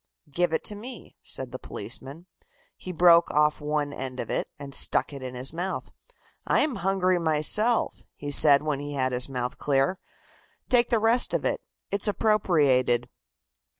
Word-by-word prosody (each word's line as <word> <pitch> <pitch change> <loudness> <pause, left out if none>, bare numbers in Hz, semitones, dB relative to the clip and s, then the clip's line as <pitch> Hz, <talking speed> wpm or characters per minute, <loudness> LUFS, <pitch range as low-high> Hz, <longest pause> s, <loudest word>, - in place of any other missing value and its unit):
"Give 175 +1 +1
it 160 - -1
to - - -1
me," 235 +4 -10
said 130 -2 -5
the 130 - -7
policeman. 135 - -6 0.5
He 185 - -8
broke 170 -1 +5
off 150 0 +1
one 150 -1 -2
end 130 -2 -6
of - - -4
it - - -2
and 140 -1 -9
stuck - - +1
it 140 - -8
in 130 -1 -7
his 130 +4 -5
mouth. 180 +3 -4 0.6
"I - - +3
am 290 -6 0
hungry 185 -1 +1
myself," 170 +9 +1
he 145 0 -6
said 145 0 +5
when 150 -3 -2
he 145 0 -6
had 130 -1 0
his 125 +1 +4
mouth 125 -1 -4
clear. 140 +6 +1 0.7
"Take 245 -1 +3
the 235 - +2
rest 225 +3 +3
of - - -2
it. - - -1 0.3
It's 200 +2 0
appropriated." 145 - +2
150 Hz, 170 wpm, -26 LUFS, 135-190 Hz, 0.7 s, broke